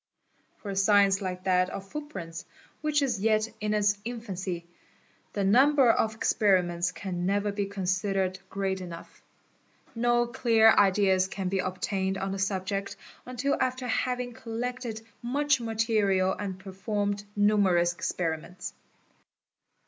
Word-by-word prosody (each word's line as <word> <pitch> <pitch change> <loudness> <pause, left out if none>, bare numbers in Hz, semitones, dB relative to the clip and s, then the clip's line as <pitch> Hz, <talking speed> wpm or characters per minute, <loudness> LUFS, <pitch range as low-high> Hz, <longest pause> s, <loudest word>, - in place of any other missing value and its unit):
For 205 - -6
a - - -4
science 195 0 +4
like 185 -1 -4
that 185 -1 +2
of 195 0 -7
footprints, 195 - -7 0.4
which 300 -1 +1
is 245 -7 0
yet 215 +1 +2
in 210 0 0
its 205 -1 +2
infancy, 190 -7 -5 0.7
the 200 - -1
number 260 +5 +5
of 220 -1 0
experiments 180 -6 +2
can 180 -2 -4
never 205 +1 +1
be 200 0 -2
considered 190 -1 -1
great 190 -1 -2
enough. 170 -2 -10 0.7
No 240 +1 +2
clear 230 -2 +4
ideas 190 -2 +4
can 190 -1 -3
be 195 0 0
obtained 190 +1 -1
on 195 0 -3
the 195 - -4
subject 195 +1 -2 0.3
until 255 +3 0
after 255 0 -1
having 250 +1 -1
collected 230 0 -5 0.2
much 280 +2 +1
material 215 -4 +1
and 195 -3 -5
performed 200 +1 -3
numerous 200 -4 +3
experiments. 175 +1 -4
200 Hz, 125 wpm, -28 LUFS, 190-225 Hz, 0.7 s, number